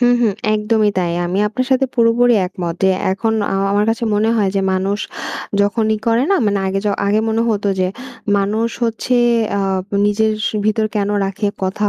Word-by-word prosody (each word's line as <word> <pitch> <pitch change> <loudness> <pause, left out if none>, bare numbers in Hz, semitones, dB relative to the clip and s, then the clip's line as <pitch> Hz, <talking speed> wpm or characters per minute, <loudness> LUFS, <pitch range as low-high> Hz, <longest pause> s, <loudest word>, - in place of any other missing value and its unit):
হুম, 245 0 +4
হুম, 225 -4 +2 0.2
একদমই 210 0 +1
তাই। 175 -2 0
আমি 180 +2 -2
আপনার 255 +5 -2
সাথে 265 +1 +3
পুরোপুরি 235 0 +4
একমত 175 -2 -4
যে 190 - +5 0.2
এখন 220 +3 -1 0.2
আ - - 0 0.2
আমার 205 +1 +2
কাছে 230 +1 -2
মনে 215 +2 +2
হয় 200 -3 +1
যে - - +2
মানুষ 195 +2 -1 0.6
যখনই 215 +2 +1
করে 230 +1 +3
না 395 - +4
মানে 200 -1 +1
আগে 190 +1 -1
য - - +3 0.2
আগে 210 +2 +2
মনে 225 +1 +1
হতো 205 -1 -1
যে, 185 - +1 0.5
"মানুষ 210 +3 0 0.2
হচ্ছে 230 +2 -1 0.4
আ - - 0 0.5
নিজের 215 +1 +1 0.3
ভিতর 215 0 +1
কেনো 205 0 0
রাখে, 195 +2 -2 0.2
কথা। 205 +2 0
210 Hz, 180 wpm, -17 LUFS, 200-225 Hz, 0.6 s, যে